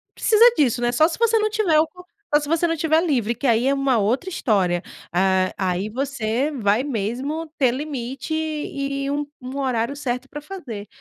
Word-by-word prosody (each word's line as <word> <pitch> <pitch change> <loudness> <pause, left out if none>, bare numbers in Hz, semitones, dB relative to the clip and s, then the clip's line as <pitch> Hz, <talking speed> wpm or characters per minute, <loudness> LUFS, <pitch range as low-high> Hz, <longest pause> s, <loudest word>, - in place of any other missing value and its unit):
precisa 440 0 +4
disso, 250 -4 +2
né, 240 0 +2
só 310 +6 +4
se 330 - -5
você 460 -1 +4
não 430 0 +1
tiver 405 -8 +2
o 315 - +3
co 360 +2 -15 0.3
só 295 - +6
se 295 - -6
você 330 +2 +1
não 330 -1 0
tiver 320 +1 +2
livre, 240 -7 0
que 245 - -6
aí 235 0 +3
é 275 - +3
uma 275 -3 +2
outra 235 - 0
história, 190 - +1 0.3
ah, 185 +1 +2
aí 190 +1 -1
você 260 +1 -1
vai 215 -3 +1
mesmo 265 +5 -3
ter 260 -4 +3
limite 270 +1 -4
e 280 -3 -2
um 290 0 -1 0.2
um 255 +2 -6
horário 255 -1 -1
certo 255 -2 -3
pra 295 - -7
fazer, 270 - -8
275 Hz, 195 wpm, -22 LUFS, 230-310 Hz, 0.3 s, só